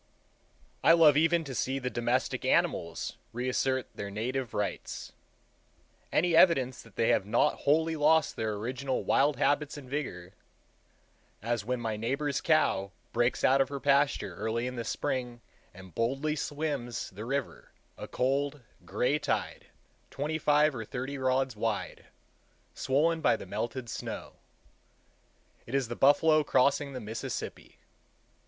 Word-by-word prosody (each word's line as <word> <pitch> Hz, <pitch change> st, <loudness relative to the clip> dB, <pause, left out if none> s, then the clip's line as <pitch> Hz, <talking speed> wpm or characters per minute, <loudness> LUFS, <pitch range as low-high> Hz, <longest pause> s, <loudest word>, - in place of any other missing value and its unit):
I 165 Hz, -, +7 dB
love 160 Hz, -4 st, +6 dB
even 165 Hz, +2 st, +3 dB
to 140 Hz, -3 st, -7 dB
see 130 Hz, +2 st, -1 dB
the 125 Hz, -2 st, -3 dB
domestic 120 Hz, +2 st, -1 dB
animals 85 Hz, -1 st, 0 dB, 0.2 s
reassert 130 Hz, +2 st, 0 dB
their 100 Hz, -, -6 dB
native 120 Hz, +4 st, -3 dB
rights—any 160 Hz, -, -4 dB
evidence 135 Hz, -8 st, +4 dB
that 115 Hz, -3 st, -18 dB
they 115 Hz, -, +2 dB
have 95 Hz, -, +2 dB
not 120 Hz, +7 st, +3 dB
wholly 160 Hz, +3 st, +3 dB
lost 155 Hz, +1 st, +3 dB
their 110 Hz, -1 st, -2 dB
original 130 Hz, +5 st, -3 dB
wild 145 Hz, +1 st, +3 dB
habits 145 Hz, +1 st, +1 dB
and 140 Hz, -3 st, -10 dB
vigor; 100 Hz, -10 st, -5 dB, 1.1 s
as 115 Hz, -2 st, -1 dB
when 125 Hz, +3 st, -2 dB
my 110 Hz, -2 st, -2 dB
neighbor's 140 Hz, +5 st, -1 dB
cow 155 Hz, -12 st, +2 dB, 0.2 s
breaks 120 Hz, +1 st, +1 dB
out 135 Hz, +1 st, +5 dB
of 135 Hz, -, +1 dB
her 140 Hz, -1 st, -4 dB
pasture 140 Hz, +1 st, +2 dB
early 110 Hz, +3 st, -2 dB
in 125 Hz, 0 st, -4 dB
the 120 Hz, -, -3 dB
spring 125 Hz, -1 st, -3 dB, 0.3 s
and 95 Hz, -1 st, -13 dB
boldly 135 Hz, -, 0 dB
swims 145 Hz, -6 st, -3 dB
the 100 Hz, +3 st, -8 dB
river, 135 Hz, +2 st, -4 dB, 0.2 s
a -, -, -8 dB
cold, 140 Hz, +2 st, -1 dB, 0.2 s
gray 145 Hz, +4 st, 0 dB
tide, -, -, -2 dB, 0.4 s
twenty 150 Hz, +3 st, -3 dB
five 150 Hz, 0 st, +3 dB
or 115 Hz, -3 st, -5 dB
thirty 130 Hz, +5 st, -5 dB
rods 130 Hz, -1 st, +1 dB
wide, 105 Hz, -1 st, -3 dB, 0.7 s
swollen 160 Hz, +5 st, +1 dB
by -, -, +4 dB
the -, -, -8 dB
melted 115 Hz, +6 st, -4 dB
snow. 115 Hz, -, -6 dB, 1.3 s
It 125 Hz, -, -4 dB
is 135 Hz, -4 st, 0 dB
the 120 Hz, -, -4 dB
buffalo 155 Hz, +3 st, +5 dB
crossing 140 Hz, +1 st, +2 dB
the 130 Hz, -, -5 dB
Mississippi. 110 Hz, 0 st, -6 dB
130 Hz, 140 wpm, -29 LUFS, 115-145 Hz, 1.3 s, I